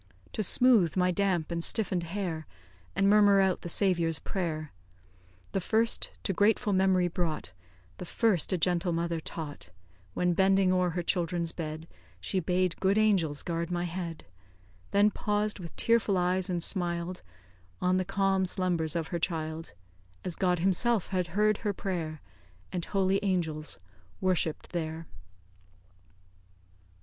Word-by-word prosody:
To -, -, -1 dB
smooth 215 Hz, -4 st, +4 dB
my 180 Hz, 0 st, +3 dB
damp 180 Hz, -3 st, 0 dB
and 170 Hz, 0 st, -2 dB
stiffen'd 190 Hz, -4 st, +2 dB
hair, 170 Hz, -2 st, -4 dB, 0.5 s
And 195 Hz, +1 st, +3 dB
murmur 205 Hz, -1 st, +6 dB
out 190 Hz, -1 st, +2 dB
the 175 Hz, -, -6 dB
Saviour's 170 Hz, -4 st, +1 dB
prayer 160 Hz, -5 st, -3 dB, 0.8 s
The -, -, 0 dB
first 225 Hz, +5 st, +1 dB
to 195 Hz, -, -1 dB
grateful 205 Hz, +2 st, +2 dB
memory 185 Hz, -1 st, +3 dB
brought, 165 Hz, -, -3 dB, 0.5 s
The -, -, -5 dB
first 205 Hz, -3 st, +1 dB
a 185 Hz, -, +2 dB
gentle 175 Hz, 0 st, 0 dB
mother 170 Hz, 0 st, -1 dB
taught, 150 Hz, -, -7 dB, 0.5 s
When, 180 Hz, 0 st, +2 dB
bending 190 Hz, 0 st, +3 dB
o'er 180 Hz, -1 st, +2 dB
her 175 Hz, +1 st, -3 dB
children's 170 Hz, -1 st, 0 dB
bed, 160 Hz, -1 st, -6 dB, 0.3 s
She 185 Hz, -, -1 dB
bade 180 Hz, 0 st, 0 dB
good 195 Hz, +2 st, +2 dB
angels 185 Hz, -9 st, +2 dB
guard 170 Hz, -1 st, -2 dB
my 175 Hz, -1 st, -1 dB
head; 170 Hz, -2 st, -5 dB, 0.6 s
Then 205 Hz, +1 st, +4 dB
paused, 210 Hz, 0 st, -1 dB
with 170 Hz, -3 st, -9 dB
tearful 225 Hz, -4 st, +2 dB
eyes, 180 Hz, +1 st, +1 dB
and 175 Hz, -2 st, -1 dB
smiled 175 Hz, -1 st, 0 dB, 0.6 s
On 180 Hz, 0 st, +2 dB
the 185 Hz, -, +1 dB
calm 195 Hz, 0 st, +1 dB
slumbers 175 Hz, -3 st, 0 dB
of 165 Hz, -1 st, -2 dB
her 170 Hz, -, -2 dB
child 160 Hz, -, -3 dB, 0.5 s
As 180 Hz, -2 st, -3 dB
God 180 Hz, -2 st, +1 dB
himself 195 Hz, +4 st, +2 dB
had 185 Hz, -2 st, -1 dB
heard 215 Hz, 0 st, +3 dB
her 205 Hz, -, -1 dB
prayer, 165 Hz, -6 st, -4 dB, 0.5 s
And 175 Hz, -2 st, -3 dB
holy 195 Hz, -1 st, +1 dB
angels 160 Hz, -6 st, -1 dB, 0.4 s
worshipped 180 Hz, -4 st, -1 dB
there. 165 Hz, -1 st, -4 dB
180 Hz, 140 wpm, -29 LUFS, 170-195 Hz, 0.8 s, murmur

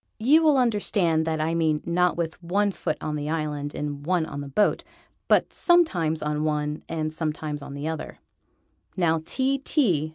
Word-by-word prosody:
You 280 Hz, +9 st, +5 dB
will 305 Hz, -3 st, +4 dB
understand 200 Hz, -9 st, +1 dB
that 160 Hz, -1 st, -1 dB
I 160 Hz, +2 st, 0 dB
mean 160 Hz, -2 st, +1 dB
not 175 Hz, +1 st, +1 dB
with 165 Hz, 0 st, -3 dB
one 200 Hz, +4 st, +1 dB
foot 155 Hz, -, -3 dB
on 150 Hz, -, -3 dB
the 150 Hz, 0 st, -3 dB
island 150 Hz, -2 st, -3 dB
and 145 Hz, -1 st, -4 dB
one 175 Hz, 0 st, +1 dB
on 145 Hz, -2 st, -6 dB
the 140 Hz, -, -6 dB
boat, 200 Hz, +10 st, +1 dB, 0.4 s
but -, -, +3 dB
sometimes 180 Hz, -, +2 dB
on 150 Hz, 0 st, -1 dB
one 150 Hz, -1 st, -1 dB
and 155 Hz, -1 st, -2 dB
sometimes 155 Hz, -2 st, -3 dB
on 140 Hz, 0 st, -8 dB
the 145 Hz, +2 st, -4 dB
other. 160 Hz, -1 st, -5 dB, 0.8 s
Now 165 Hz, -3 st, +2 dB
T. 270 Hz, +8 st, 0 dB
T. 190 Hz, -, +1 dB
160 Hz, 175 wpm, -25 LUFS, 150-185 Hz, 0.8 s, You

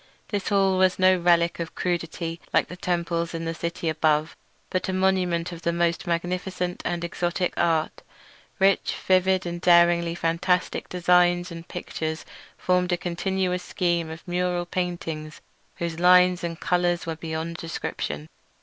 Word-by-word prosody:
This 205 Hz, -2 st, -2 dB
hall 195 Hz, -2 st, +3 dB
was 185 Hz, -1 st, +3 dB
no 185 Hz, 0 st, +5 dB
relic 170 Hz, -1 st, +2 dB
of 165 Hz, -1 st, -5 dB
crudity 170 Hz, -1 st, -3 dB
like -, -, +2 dB
the 180 Hz, -, -7 dB
temples 170 Hz, -1 st, -2 dB
in 165 Hz, 0 st, -4 dB
the 165 Hz, -, -2 dB
city 170 Hz, 0 st, -4 dB
above, 155 Hz, 0 st, +1 dB, 0.4 s
but 185 Hz, +1 st, -1 dB
a -, -, -1 dB
monument 185 Hz, -2 st, +1 dB
of 170 Hz, -1 st, -8 dB
the 170 Hz, -, 0 dB
most 170 Hz, 0 st, 0 dB
magnificent 180 Hz, +1 st, -2 dB
and 175 Hz, -1 st, -2 dB
exotic 175 Hz, +1 st, -1 dB
art. 165 Hz, -2 st, 0 dB, 0.6 s
Rich, 195 Hz, -1 st, +2 dB
vivid, 185 Hz, 0 st, +3 dB
and 175 Hz, 0 st, -4 dB
daringly 170 Hz, -1 st, +4 dB
fantastic 175 Hz, +2 st, 0 dB
designs 175 Hz, 0 st, +3 dB
and 165 Hz, 0 st, -9 dB
pictures 160 Hz, -2 st, -5 dB, 0.3 s
formed 180 Hz, 0 st, +1 dB
a 175 Hz, -, +2 dB
continuous 180 Hz, +1 st, -1 dB
scheme 175 Hz, -3 st, -1 dB
of 160 Hz, +3 st, -10 dB
mural 180 Hz, 0 st, -1 dB
painting 170 Hz, -4 st, -4 dB, 0.4 s
whose 170 Hz, -1 st, -4 dB
lines 180 Hz, 0 st, +5 dB
and 165 Hz, -1 st, -4 dB
colours 175 Hz, 0 st, +1 dB
were 165 Hz, -1 st, -3 dB
beyond 160 Hz, +1 st, -4 dB
description. 75 Hz, -, -4 dB
175 Hz, 150 wpm, -25 LUFS, 170-180 Hz, 0.6 s, no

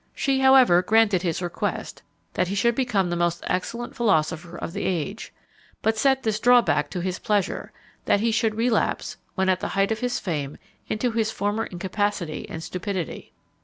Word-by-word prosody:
She, 270 Hz, -2 st, +1 dB
however, 265 Hz, -9 st, +6 dB
granted 215 Hz, -2 st, +3 dB
his 175 Hz, 0 st, -2 dB
request, 175 Hz, -, -3 dB, 0.3 s
that 180 Hz, -, 0 dB
he 195 Hz, -, -3 dB
should 235 Hz, +4 st, +2 dB
become 215 Hz, -8 st, 0 dB
the -, -, 0 dB
most 170 Hz, 0 st, 0 dB
excellent 235 Hz, +6 st, -3 dB
philosopher 170 Hz, -5 st, 0 dB
of 170 Hz, -, -6 dB
the -, -, -3 dB
age; 185 Hz, +3 st, -3 dB, 0.5 s
but 220 Hz, 0 st, +2 dB
set 265 Hz, +3 st, +2 dB
this 215 Hz, -1 st, 0 dB
drawback 230 Hz, -, +4 dB
to 180 Hz, -, -4 dB
his 185 Hz, 0 st, -3 dB
pleasure, 205 Hz, -3 st, -1 dB, 0.3 s
that -, -, +3 dB
he 230 Hz, +2 st, +1 dB
should 220 Hz, -1 st, +1 dB
relapse, 230 Hz, +1 st, 0 dB, 0.2 s
when 190 Hz, -1 st, +1 dB
at 185 Hz, -1 st, +2 dB
the -, -, -3 dB
height 195 Hz, +2 st, +2 dB
of 220 Hz, -, -1 dB
his 245 Hz, 0 st, -1 dB
fame, 150 Hz, -6 st, -3 dB, 0.3 s
into 235 Hz, +3 st, -1 dB
his 225 Hz, -1 st, 0 dB
former 210 Hz, +1 st, -1 dB
incapacity 190 Hz, -2 st, -3 dB
and 160 Hz, -, -6 dB
stupidity. 185 Hz, -1 st, -5 dB
205 Hz, 175 wpm, -24 LUFS, 175-225 Hz, 0.5 s, however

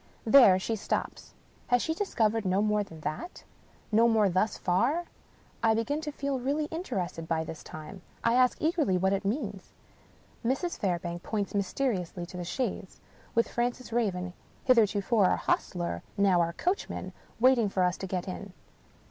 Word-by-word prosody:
There 225 Hz, -6 st, +8 dB
she 225 Hz, +4 st, -2 dB
stops. 210 Hz, -, -4 dB, 0.3 s
Has 245 Hz, -1 st, +3 dB
she 320 Hz, -, 0 dB
discovered 225 Hz, -, 0 dB
no 190 Hz, +1 st, +2 dB
more 210 Hz, -1 st, +2 dB
than 165 Hz, -6 st, -12 dB
that? 155 Hz, -, -5 dB, 0.5 s
No 225 Hz, +2 st, +5 dB
more 220 Hz, -3 st, +4 dB
thus 185 Hz, +4 st, +1 dB
far. 245 Hz, -, +1 dB, 0.6 s
I 225 Hz, -1 st, +4 dB
begin 255 Hz, +7 st, -1 dB
to 300 Hz, -1 st, -4 dB
feel 280 Hz, -2 st, -2 dB
really 285 Hz, +4 st, 0 dB
interested 185 Hz, -, -3 dB
by 160 Hz, -1 st, 0 dB
this 160 Hz, 0 st, -8 dB
time. 155 Hz, +5 st, -9 dB, 0.2 s
I 230 Hz, -, +3 dB
ask 250 Hz, 0 st, +3 dB
eagerly 310 Hz, -, +2 dB
what 190 Hz, +2 st, +2 dB
it 195 Hz, -, -1 dB
means? 205 Hz, -3 st, -3 dB, 0.7 s
Mrs. 270 Hz, +9 st, 0 dB
Fairbank 175 Hz, -2 st, -2 dB
points 205 Hz, -1 st, -3 dB
mysteriously 195 Hz, -4 st, -1 dB
to 180 Hz, +1 st, -9 dB
the 175 Hz, -, -4 dB
chaise 190 Hz, 0 st, -3 dB, 0.2 s
— -, -, -24 dB
^with 230 Hz, -, +4 dB
Francis 240 Hz, 0 st, -2 dB
Raven 180 Hz, -6 st, -1 dB, 0.3 s
(hitherto 220 Hz, -5 st, +4 dB
our 195 Hz, -3 st, +5 dB
hostler, 170 Hz, -, -1 dB, 0.2 s
now 195 Hz, -3 st, +4 dB
our 170 Hz, 0 st, 0 dB
coachman) 365 Hz, -, -2 dB, 0.3 s
waiting 245 Hz, -3 st, +4 dB
for 190 Hz, -1 st, +1 dB
us 180 Hz, 0 st, +2 dB
to 190 Hz, -, -5 dB
get 185 Hz, 0 st, -3 dB
in. 190 Hz, +1 st, -6 dB
210 Hz, 165 wpm, -29 LUFS, 180-245 Hz, 0.7 s, There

